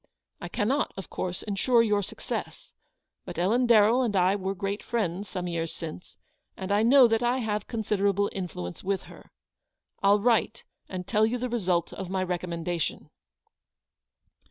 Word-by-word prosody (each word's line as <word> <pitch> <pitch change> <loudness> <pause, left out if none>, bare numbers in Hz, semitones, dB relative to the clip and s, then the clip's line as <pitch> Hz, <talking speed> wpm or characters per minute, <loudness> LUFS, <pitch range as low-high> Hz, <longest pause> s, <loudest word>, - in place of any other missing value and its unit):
I - - -5
cannot, 260 +8 0
of 195 - -8
course, 180 -1 -3
ensure 230 +4 +3
you 210 -2 +2
success; 210 +3 -6 0.5
but - - -8
Ellen 225 +8 +2
Darrell 230 +2 +5
and 230 -5 0
I 185 +1 +4
were 195 0 -3
great 200 +1 -3
friends 205 -4 -2
some 180 -2 -4
years 165 -2 -2
since, 165 +1 -8 0.4
and 190 +1 -4
I 205 +1 +3
know 250 +2 +7
that 225 0 +1
I 245 +1 +2
have 210 -4 -2
considerable 205 -3 +1
influence 120 - -5
with 195 0 -1
her. - - -15 0.7
I'll 200 +1 +5
write 230 0 +1 0.3
and 185 -1 -5
tell 215 +1 +3
you 240 +2 -1
the 250 +1 -3
result 185 -7 0
of 190 -2 -6
my 190 0 0
recommendation." 175 -2 -3
200 Hz, 155 wpm, -27 LUFS, 180-225 Hz, 0.7 s, know